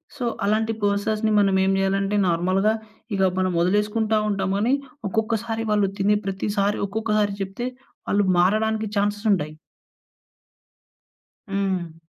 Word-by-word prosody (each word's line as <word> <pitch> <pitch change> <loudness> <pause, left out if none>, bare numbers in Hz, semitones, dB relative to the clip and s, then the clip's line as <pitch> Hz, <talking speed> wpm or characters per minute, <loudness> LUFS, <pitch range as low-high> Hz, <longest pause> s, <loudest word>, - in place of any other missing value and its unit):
So 260 -4 -3 0.2
అలాంటి 220 +2 +1
పర్సన్స్‌ని 210 +2 +1
మనం 195 -1 +3
ఏం 190 - +2
జేయాలంటే, 195 +1 0
నార్మల్‌గా 185 +5 +2 0.4
ఇగ 195 - 0 0.2
మనం 185 0 +1
వదిలేసుకుంటా 210 +4 +1
ఉంటాము. 195 -1 -1
కానీ 240 +5 +2 0.4
ఒక్కొక్కసారి 225 +1 -1
వాళ్ళు 205 -2 +2
తినే 210 +2 +3
ప్రతిసారి 200 +1 -1
ఒక్కొక్కసారి 210 -1 0
చెప్తే, 195 +6 -3 0.4
వాళ్ళు 205 0 +2
మారడానికి 215 +4 +2
ఛాన్సెస్ 205 +2 0
ఉంటాయి. 155 -4 -2 2.0
హ్మ్. 185 -4 -2
205 Hz, 115 wpm, -23 LUFS, 195-220 Hz, 2.0 s, మనం